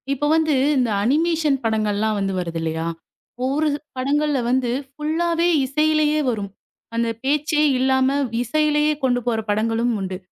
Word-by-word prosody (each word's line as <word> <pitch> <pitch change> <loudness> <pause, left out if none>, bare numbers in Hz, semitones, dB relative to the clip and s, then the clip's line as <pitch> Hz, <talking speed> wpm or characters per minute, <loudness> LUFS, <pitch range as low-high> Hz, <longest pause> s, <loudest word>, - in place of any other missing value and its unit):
இப்ப 295 +2 -1
வந்து 315 -1 +2 0.2
இந்த 250 -3 +1
அனிமேஷன் 310 +3 +2
படங்களெல்லாம் 215 -1 0
வந்து 195 -1 -1
வருது 170 -2 -4
இல்லையா? 160 0 -2 0.6
ஒரு 290 +4 +1
து - - -1 0.2
படங்கள்ல 285 +2 +1
வந்து 250 -1 +1 0.2
ஃபுல்லாவே 330 +4 0 0.2
இசையிலேயே 305 +2 +2
வரும். 205 -4 -3 0.5
அந்தப் 230 -1 -1
பேச்சே 300 +2 +1 0.2
இல்லாம 265 +1 +2 0.3
இசையிலேயே 300 +3 +1
கொண்டு 245 -2 +2
போற 230 -2 +1
படங்களும் 225 +3 +1
உண்டு. 190 -1 -4
265 Hz, 135 wpm, -21 LUFS, 225-300 Hz, 0.6 s, வந்து